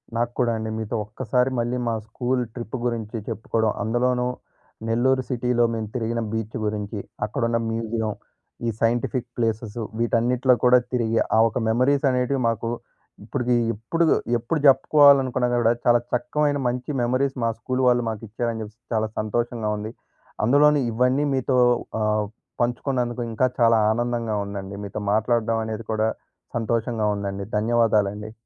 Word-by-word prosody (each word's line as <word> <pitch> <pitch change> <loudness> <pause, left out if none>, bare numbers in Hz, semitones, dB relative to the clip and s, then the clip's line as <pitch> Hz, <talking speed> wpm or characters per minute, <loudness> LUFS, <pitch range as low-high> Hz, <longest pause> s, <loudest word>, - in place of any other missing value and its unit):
నాకు 120 +1 0
కూడా 120 -2 +3
అండి. 110 0 -4
మీతో 110 +1 -3
ఒక్కసారి 125 +4 0
మళ్ళీ 120 +2 -1
మా 115 - +1
స్కూల్ 125 +3 -1
ట్రిప్ 120 -1 -6
గురించి 115 -2 -2
చెప్పుకోవడం. 110 0 0
అందులోనూ 125 +2 +1 0.6
నెల్లూరు 130 +3 +2
సిటీలో 125 -1 +1
మేము 110 -1 -3
తిరిగిన 115 -1 -1
బీచ్ 110 0 -4
గురించి, 105 0 -3 0.3
అక్కడున్న 115 +1 0
మ్యూజియం. 115 -1 -2 0.6
ఈ - - +2
సైంటిఫిక్ 120 +2 0
ప్లేసెసు 115 -1 -2 0.2
వీటన్నిటిలో 120 +2 +2
కూడా 125 0 +7 0.2
తిరిగి 115 -2 +1 0.2
ఆ - - +6
ఒక 115 - -4
మెమరీస్ 130 +6 +2
అనేటివి 125 +1 0
మాకు 115 0 -2 0.5
ఇప్పటికి 125 +2 -1 0.2
ఎప్పుడు 120 +11 -1 0.3
ఎప్పుడు 120 +8 -2
చెప్పుకోవాలనుకున్నా 135 -2 +5
కూడా 115 0 +4
చాలా 120 0 +5
చక్కమైన 145 +4 +1
మంచి 125 +2 -3
మెమరీస్ 130 +3 +1
మా 115 - +2
స్కూల్ 130 +3 -2
వాళ్ళు 120 -1 +4
మాకిచ్చారని 115 +1 -4
చెప్పేసి 110 +2 -10
చాలా 110 -1 +1
సంతోషంగా 115 +1 -1
ఉంది. 105 +1 -5 0.5
అందులోని 145 +4 +5
ఇవన్నీ 125 +5 +2
మీతో 130 0 +1 0.4
ఆహ్, 105 0 +1 0.4
పంచుకున్నందుకు 120 0 -1
ఇంకా 120 +3 +2
చాలా 115 -1 +5
ఆనందంగా 120 -1 -1
ఉందండి. 100 -1 -6
మీతో 100 +1 -5
మాట్లాడడం 115 +1 +1
అనేది 110 0 -5
కూడా 110 0 +1 0.5
సంతోషంగా 115 -1 0
ఉందండి. 100 -1 -4
ధన్యవాదాలండి. 105 -2 +1
115 Hz, 135 wpm, -24 LUFS, 110-125 Hz, 0.6 s, కూడా